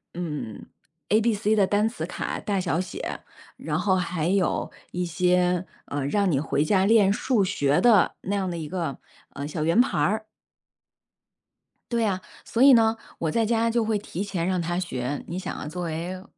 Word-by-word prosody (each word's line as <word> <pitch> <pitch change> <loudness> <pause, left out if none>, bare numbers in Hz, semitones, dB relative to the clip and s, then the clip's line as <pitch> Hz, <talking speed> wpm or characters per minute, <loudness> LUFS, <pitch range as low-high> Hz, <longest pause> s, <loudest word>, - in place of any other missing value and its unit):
嗯 150 -11 -5 0.4
，ABC 215 0 +2
的 200 - +4
单 205 +3 +2
词 225 - -4
卡 - - -4
大 200 -3 -1
小 175 -2 0
写， 185 -1 -6 0.3
然 - - -3
后 190 -2 +2
还 175 -3 -1
有 190 -1 +1 0.2
一 180 0 -2
些， 180 +1 +2 0.2
呃， 140 -1 -3
让 200 +5 +2
你 150 - +2
回 150 -1 0
家 190 +3 +3
练 210 -2 +5
数 230 -4 +1
学 145 -7 +1
的 220 -7 +4
那 200 +2 -2
样 190 -2 -1
的 170 - -4
一 160 -2 -5
个， 165 -4 -3 0.3
呃， 140 +1 -6
小 155 +1 -3
圆 165 +7 +3
盘 245 - +3
儿。 215 +8 +1 1.7
对 235 -1 +2
啊， 190 -3 0 0.2
所 235 - 0
以 275 0 +9
呢， 225 -2 +5 0.2
我 160 -2 -1
在 230 +4 +1
家 230 +1 +2
就 235 0 +1
会 215 -1 0
提 200 -1 -5
前 185 -4 -2
让 185 -1 0
她 175 +1 -2
学， 145 -6 -3
你 175 +2 -4
想 - - -4
啊， - - -6
作 180 +3 -5
为 175 +3 -4
185 Hz, 205 characters per minute, -25 LUFS, 165-210 Hz, 1.7 s, 以